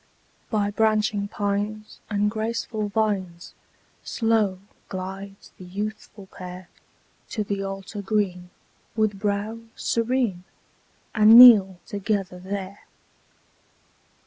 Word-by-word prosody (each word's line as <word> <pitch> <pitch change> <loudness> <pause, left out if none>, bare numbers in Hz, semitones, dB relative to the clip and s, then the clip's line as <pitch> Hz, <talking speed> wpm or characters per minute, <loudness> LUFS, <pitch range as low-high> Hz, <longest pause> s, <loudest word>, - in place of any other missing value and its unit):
By 205 -2 0
branching 215 -1 +1
pines 205 +1 -3
and 210 0 +1
graceful 220 -1 -3
vines, 195 -5 -2 0.5
Slow 220 -5 +1 0.3
glides 195 +1 -7
the - - -10
youthful 205 +2 -6
pair 180 -1 -10 0.6
To 215 - -2
the 200 -1 -3
altar 195 +1 -6
green, 190 -3 -1 0.5
with 215 -3 0
brow 205 +2 -2 0.2
serene, 230 -6 -1 0.7
And 220 +1 +7
kneel 210 -7 +9
together 200 -3 -3
there. 195 +1 -7
205 Hz, 95 wpm, -24 LUFS, 195-215 Hz, 0.7 s, kneel